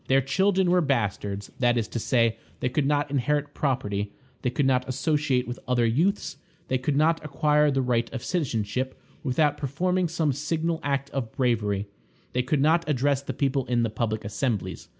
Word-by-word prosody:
Their 135 +1 +4
children 185 +6 +2
were 180 0 +4
bastards; 105 - -1
that 120 -1 +3
is 115 - 0
to 120 - -3
say, 115 -1 +2 0.2
they 125 - 0
could 135 +2 0
not 145 -1 +1
inherit 145 +1 0
property, 105 -8 -1 0.3
they 125 - +1
could 130 +3 0
not 130 -1 +2
associate 140 -1 +1
with 120 - -5
other 125 -2 +2
youths, 165 - +1 0.3
they 130 - +1
could 140 +3 -1
not 160 +2 +3
acquire 150 0 +2
the 135 -2 +1
right 120 -2 0
of 130 -2 -5
citizenship 130 - -2 0.2
without 145 +2 +2
performing 180 +6 0
some 160 -3 0
signal 160 +3 -1
act 140 -1 -1
of 120 -5 -3
bravery, 105 -6 0 0.5
they 125 - +2
could 135 +3 0
not 160 +2 +3
address 140 0 +2
the 140 - -4
people 135 -2 0
in 120 -1 +2
the 115 - -1
public 110 -1 -2
assemblies. 105 0 -2
135 Hz, 180 wpm, -26 LUFS, 120-150 Hz, 0.5 s, Their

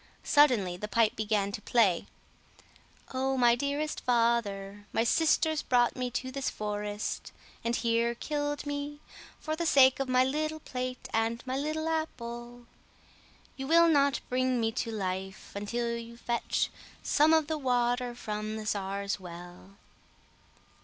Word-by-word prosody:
Suddenly 240 - +4
the 210 - -5
pipe 225 0 +2
began 210 -2 0
to 210 - -5
play— 205 -7 +2 1.1
"Oh, 265 +1 0
my 240 -2 +5
dearest 285 +4 -1
father; 205 -4 0
my 225 - +2
sisters 315 +4 +2
brought 245 -1 +2
me 250 -1 -2
to 255 +2 -4
this 275 0 -2
forest, 210 0 -4 0.3
and 235 +1 0
here 235 0 +1
killed 290 +2 -3
me 290 0 -4 0.4
for 310 -1 -3
the 335 +1 -1
sake 265 -3 +6
of 270 -1 -2
my 255 0 +5
little 310 +4 -1
plate 255 -3 -5
and 225 +2 0
my 260 0 -2
little 310 +3 -2
apple. 240 -6 -4 0.9
You 270 -1 -5
will 335 +2 +6
not 280 -3 +3
bring 255 0 +1
me 225 -1 +1
to 230 - -3
life 190 -2 -4
until 235 +4 -2
you 235 0 -8
fetch 235 0 -1 0.3
some 305 +1 +4
of 320 -1 +4
the 310 0 -2
water 245 -2 +1
from 215 -2 -4
the 215 -1 -5
czar's 200 -1 -2
well." 175 +2 -11
240 Hz, 145 wpm, -30 LUFS, 215-280 Hz, 1.1 s, sake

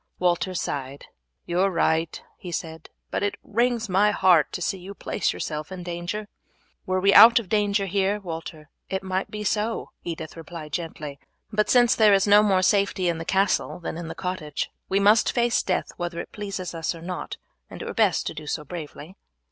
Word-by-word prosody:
Walter 180 +1 0
sighed. 140 -4 -4 0.4
"You 175 +1 -1
are 195 +1 +4
right," 165 -2 0 0.2
he 180 - -7
said, 160 -1 -6 0.2
"but - - -1
it 205 0 0
wrings 235 +1 0
my 195 +2 +3
heart 180 -6 +4
to - - -3
see 185 +2 -2
you 195 +3 -9
place - - -1
yourself 150 +3 -5
in 185 -1 -6
danger." 175 +5 -4 0.6
"Were 185 0 +1
we 195 +1 +4
out 230 +1 +10
of 225 -6 -1
danger 205 -1 +1
here, 195 +2 0
Walter, 160 -4 -8 0.2
it 190 0 -2
might 190 0 -2
be 210 0 -5
so," 215 +2 -1
Edith 160 -2 -6
replied 160 -2 -9
gently; 155 -4 -5 0.3
"but 210 0 +1
since 245 0 +5
there 215 -3 +5
is 195 - +2
no 205 0 +7
more 195 -3 +3
safety 195 -2 +2
in 165 -1 -2
the 165 - -5
castle 195 0 +1
than 170 - -5
in 170 0 -6
the - - -6
cottage, 180 -6 -4 0.2
we 195 - +2
must 210 +3 +4
face 240 -1 +2
death 185 - -1
whether 175 -1 -4
it - - -7
pleases 195 -4 -5
us 165 +1 -2
or 165 - -11
not, 180 +1 -5 0.3
and - - -8
it - - -7
were - - -5
best 210 -7 +2
to - - -3
do 155 -1 -9
so 150 - -3
bravely." 160 +2 -8
185 Hz, 200 wpm, -25 LUFS, 165-205 Hz, 0.6 s, out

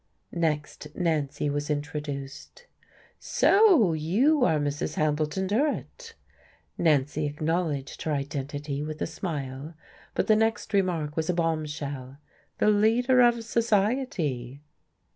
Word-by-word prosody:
Next, 150 -3 -2
Nancy 150 -4 -1
was 145 +1 -2
introduced. 145 - -5 0.5
"So 365 - +4
you 225 - +2
are 160 -10 +3
Mrs. 145 0 -2
Hambleton 155 +4 0
Durrett?" 300 - -2 0.6
Nancy 150 -2 +1
acknowledged 150 -1 -2
her 155 - -2
identity 145 0 -3
with 155 0 -5
a - - 0
smile, 150 -3 -5 0.4
but - - +1
the 215 - +4
next 220 -1 0
remark 170 -7 0
was 160 0 -2
a 180 - +1
bombshell. 150 -5 -3 0.4
"The 210 - +4
leader 235 +5 +4
of 240 -1 +4
society." 205 - -1
155 Hz, 110 wpm, -27 LUFS, 145-210 Hz, 0.6 s, So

